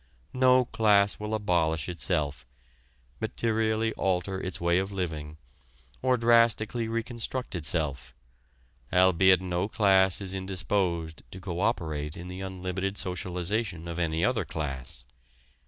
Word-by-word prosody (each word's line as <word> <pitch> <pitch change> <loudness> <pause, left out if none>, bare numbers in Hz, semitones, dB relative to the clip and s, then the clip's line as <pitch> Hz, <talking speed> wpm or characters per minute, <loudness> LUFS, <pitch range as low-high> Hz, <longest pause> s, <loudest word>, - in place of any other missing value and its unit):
No 130 0 +5
class 105 -3 +3
will 105 +1 -2
abolish 80 -7 0
itself, 75 -7 -2 0.7
materially 110 0 0
alter 95 0 -1
its 95 - -3
way 85 +1 +2
of 95 +1 -3
living, 80 -5 -4 0.6
or 130 -1 +3
drastically 115 -1 +3
reconstruct 115 +2 -3
itself, 75 -6 -2 0.8
albeit 95 0 +5
no 90 +1 -1
class 95 -3 +3
is 95 -2 -3
indisposed 95 -4 -2
to 95 - -9
co 90 -2 -5
operate 80 -8 -1
in 90 +1 -8
the 90 +1 -7
unlimited 95 +1 -3
socialization 90 0 -2
of 85 0 -4
any 80 0 +1
other 120 -4 +1
class. 70 -4 -5
95 Hz, 120 wpm, -28 LUFS, 85-110 Hz, 0.8 s, No